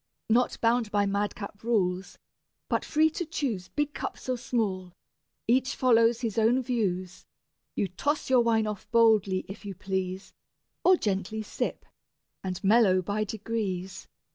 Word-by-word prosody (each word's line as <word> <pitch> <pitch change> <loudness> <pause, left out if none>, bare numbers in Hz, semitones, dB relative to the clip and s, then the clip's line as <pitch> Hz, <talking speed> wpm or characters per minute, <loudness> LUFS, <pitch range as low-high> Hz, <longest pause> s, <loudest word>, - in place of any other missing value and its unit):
Not 245 +2 +2
bound 230 -1 +2
by 205 -1 +2
mad 200 +1 -1
cap 200 0 -8
rules, 190 -5 0 0.5
but - - +1
free 315 +1 +3
to 350 - -3
choose 265 - -3
Big 295 +6 -2
cups - - -6
or 255 - +1
small, 200 -7 -2 0.5
each 255 +2 +2
follows 230 -1 +4
his 225 -3 -1
own 240 +4 +3
views: 185 -7 -2 0.5
You 200 - 0
toss 285 - -2
your 255 -2 +5
wine 225 -2 +2
off 210 -2 -5
boldly, 215 -5 +3
if 195 +3 -9
you 200 -2 -6
please, 190 +1 -4 0.5
Or 370 - +7
gently 210 - -2
sip, - - -4 0.6
and 185 -1 -4
mellow 195 -3 +4
by 205 +4 -1
degrees. 195 -3 -4
215 Hz, 145 wpm, -28 LUFS, 190-240 Hz, 0.6 s, Or